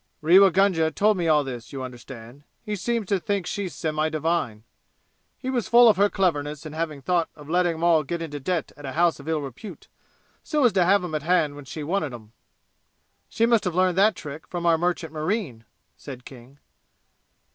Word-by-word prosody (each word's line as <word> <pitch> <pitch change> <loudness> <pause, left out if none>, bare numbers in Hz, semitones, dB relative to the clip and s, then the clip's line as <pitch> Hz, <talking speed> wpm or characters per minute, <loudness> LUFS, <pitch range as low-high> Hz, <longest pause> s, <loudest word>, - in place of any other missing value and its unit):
Rewa 185 +5 +7
Gunga 185 -3 +2
told 210 +6 +2
me 170 -2 -1
all 150 -2 +4
this, 125 -4 -8
you 135 -2 -5
understand. 125 0 -10 0.2
He 210 - -3
seems 230 +2 -2
to 195 - +2
think 200 -2 -2
she's 195 -1 -4
semi 155 0 -1
divine. 155 -9 -2 0.7
He 260 - -4
was 240 -6 -1
full 240 0 +7
of 215 - +5
her 205 +1 +4
cleverness 150 -6 -1
in 155 - -7
having 155 -3 -4
thought 170 +1 0
of 150 -2 -13
letting 175 +1 +1
'em 160 - -6
all 170 -2 +4
get 170 +4 -4
into 150 -3 -6
debt 165 +3 -2
at 145 - -14
a 135 -1 -5
house 170 0 +2
of 140 - -12
ill 160 -2 0
repute, 140 - -9 0.5
so 300 -4 0
as 235 - +4
to 185 -3 +3
have 195 +1 +3
'em 175 -3 -5
at 155 - -1
hand 155 -2 +1
when 145 -1 -11
she 150 +3 -7
wanted 155 -5 -2
'em." 110 -2 -14 1.0
"She 230 - +1
must 230 -2 +3
have 180 -4 -2
learned 185 0 +2
that 210 0 +4
trick 150 -1 -9
from 175 -1 -5
our 170 -1 +5
merchant 170 -1 -2
marine," 155 - -3 0.3
said 130 -3 -10
King. 130 +1 -14
165 Hz, 205 wpm, -24 LUFS, 145-190 Hz, 1.0 s, Rewa